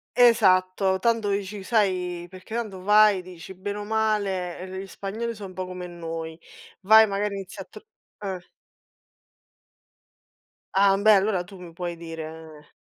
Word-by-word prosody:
Esatto. 190 -5 +4
Tanto 225 -1 +1
dici 200 0 -3
sai, 185 -5 0
perché 185 +3 -11
tanto 210 -6 -4
vai, 210 -1 +5
dici: 180 0 -11
"Bene 200 +2 -5
o 205 - -5
male, 205 -5 -1
ehm, 185 - -7
le 190 0 -5
i 195 - -10
spagnoli 220 +5 -5
'so 205 -3 -9
un 185 - -9
po' 185 0 -4
come 180 -1 -7
noi. 165 -2 -6 0.4
Vai, 220 +3 +7
magari 200 0 -2
inizi 195 -2 -7
a - - -6
tr" - - -13 0.4
eh. 190 -3 -5 2.3
Ah, 195 0 +5
mbeh, 210 +1 +5
allora 190 -2 0
tu 190 +2 -13
mi 170 -2 -11
puoi 175 0 -5
dire 160 -2 -9
190 Hz, 155 wpm, -25 LUFS, 180-210 Hz, 2.3 s, Vai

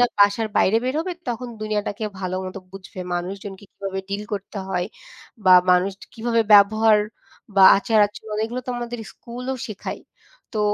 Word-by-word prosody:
না 245 - +6
বাসার 205 +2 +4
বাইরে 220 +4 +4
বেরোবে 320 +7 -1 0.2
তখন 245 +1 -3
দুনিয়াটাকে 210 0 -2 0.2
ভালোমতো 185 +1 -4
বুঝবে, 190 -1 -9
মানুষজনকে 195 +2 -5
কীভাবে 195 -1 -5
ডিল 200 +1 -3
করতে 200 +1 -6
হয় 180 -1 -1 0.6
বা 185 - +8 0.2
মানুষ 180 +2 +3 0.2
কীভাবে 230 0 +1
ব্যবহার 215 +1 +6 0.6
বা 195 - +7 0.2
আচার-আচরণ 210 0 0
এগুলো 240 +3 -4
তো - - -2
আমাদের 240 0 -5
স্কুলও 250 +2 -6
শেখায়। 210 -3 -6 0.5
তো 215 - 0
210 Hz, 140 wpm, -22 LUFS, 195-230 Hz, 0.6 s, বা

